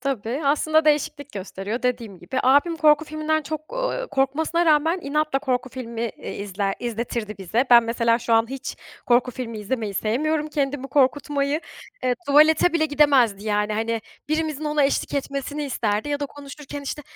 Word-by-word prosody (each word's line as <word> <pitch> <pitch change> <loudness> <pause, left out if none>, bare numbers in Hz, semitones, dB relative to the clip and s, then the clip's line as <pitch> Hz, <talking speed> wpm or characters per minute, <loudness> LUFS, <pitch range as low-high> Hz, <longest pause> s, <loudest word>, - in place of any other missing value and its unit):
Tabii, 260 0 -2
aslında 310 +2 +3
değişiklik 300 -2 0
gösteriyor. 200 +4 -5
Dediğim 235 -6 -2
gibi, 260 - -4
abim 285 +6 +4
korku 310 0 +4
filminden 310 0 -1
çok, 310 +6 -6
ııı, - - -2
korkmasına 315 +5 +1
rağmen, 320 +4 +3
inatla 300 0 0
korku 255 -2 -1
filmi, 235 -2 -4
iii, - - -7
izler 195 0 -2
izletirdi 230 -3 -4
bize. 215 +7 0
Ben 235 -1 +9
mesela, 230 0 +1
şu 230 - -2
an 225 0 +4
hiç 270 0 -6 0.3
korku 245 +1 +3
filmi 230 -3 -6
izlemeyi 215 -1 -3
sevmiyorum, 300 +10 0
kendimi 280 -2 -2
korkutmayı. 285 +2 +1 0.4
Eee, 250 -1 +2
tuvalete 310 +4 +5
bile 320 -2 +2
gidemezdi 270 -9 +3
yani, 210 0 0
hani, 225 +1 -1 0.3
birimizin 310 -1 -1
ona 300 -1 +2
eşlik 275 - 0
etmesini 280 +1 -3
isterdi 220 -3 -1
ya 290 0 -2
da 285 - -1
konuşurken, 285 0 -9
işte, 295 +2 -5
275 Hz, 160 wpm, -23 LUFS, 230-300 Hz, 0.4 s, Ben